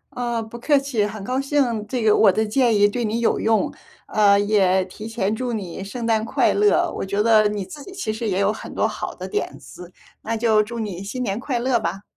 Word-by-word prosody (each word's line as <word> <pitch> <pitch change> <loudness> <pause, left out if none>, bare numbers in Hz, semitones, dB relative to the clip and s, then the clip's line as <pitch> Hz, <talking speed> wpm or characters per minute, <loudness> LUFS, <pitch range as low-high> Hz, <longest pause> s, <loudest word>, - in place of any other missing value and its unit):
呃， 240 -2 -2
不 235 +2 -10
客 290 +4 +3
气， 270 -7 0
很 210 -1 -6
高 255 +5 -1
兴， 260 -7 0
这 245 0 -2
个 215 -1 +5
我 200 -3 +6
的 220 +3 0
建 235 +1 +2
议 205 0 +5
对 240 +4 -3
你 225 +1 -1
有 235 - +1
用。 220 -3 +1 0.3
呃， 200 -1 +4
也 190 -3 +2
提 215 +4 -9
前 215 -1 -1
祝 250 0 -3
你 195 -3 -5
圣 230 +4 -6
诞 220 -1 +2
快 225 - +1
乐， 415 0 +3
我 - - -3
觉 200 +2 0
得 215 -2 +5
你 205 -2 -3
自 290 +8 -10
己 385 - -11
其 310 - -3
实 225 +1 -4
也 190 -2 0
有 200 +1 +2
很 - - -9
多 - - +2
好 - - -5
的 - - -7
点 420 - -3
子， 180 0 -12 0.3
那 225 +1 -3
就 220 -2 +3
祝 235 +3 -5
你 205 -5 -4
新 250 +6 -4
年 200 -1 -2
快 255 -1 -2
乐 240 -1 +1
吧。 195 -1 -4
220 Hz, 255 characters per minute, -22 LUFS, 205-240 Hz, 0.3 s, 我